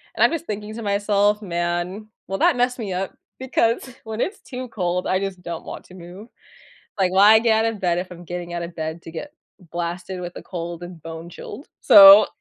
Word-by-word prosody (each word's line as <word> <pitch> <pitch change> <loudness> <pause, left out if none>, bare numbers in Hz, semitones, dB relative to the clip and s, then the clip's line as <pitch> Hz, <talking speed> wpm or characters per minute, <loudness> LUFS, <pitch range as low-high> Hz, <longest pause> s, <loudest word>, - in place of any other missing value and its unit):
And - - +2
I'm - - +5
just 330 0 -3
thinking 210 +1 -5
to 230 - -6
myself, 205 +1 +1
"Man, 175 +3 -3 0.2
will 195 - -3
that - - +3
mess 250 +1 0
me 205 -5 -4
up?" 185 +1 -4 0.2
Because 255 -1 0
when 220 +1 -4
it's 400 - -2
too 255 -1 -7
cold, 180 -4 -2
I 185 - +1
just 195 -2 -5
don't 170 -2 -6
want - - -8
to - - -16
move. 185 +5 -11 0.7
Like, 185 -2 +2
why 205 +3 +7
get 225 -1 +2
out 225 - 0
of 210 - -10
bed 175 -2 +1
if 180 0 -6
I'm 175 0 -10
getting 175 0 -6
out 170 0 -3
of 170 0 -8
bed 160 +1 -5
to 165 - -10
get 230 - -7 0.4
blasted 175 +2 -4
with 175 0 -7
a - - -10
cold 170 -1 -6
and 175 -2 -10
bone 165 +1 -8
chilled? 270 - -10
So 200 -3 +10
190 Hz, 220 wpm, -22 LUFS, 175-215 Hz, 0.7 s, So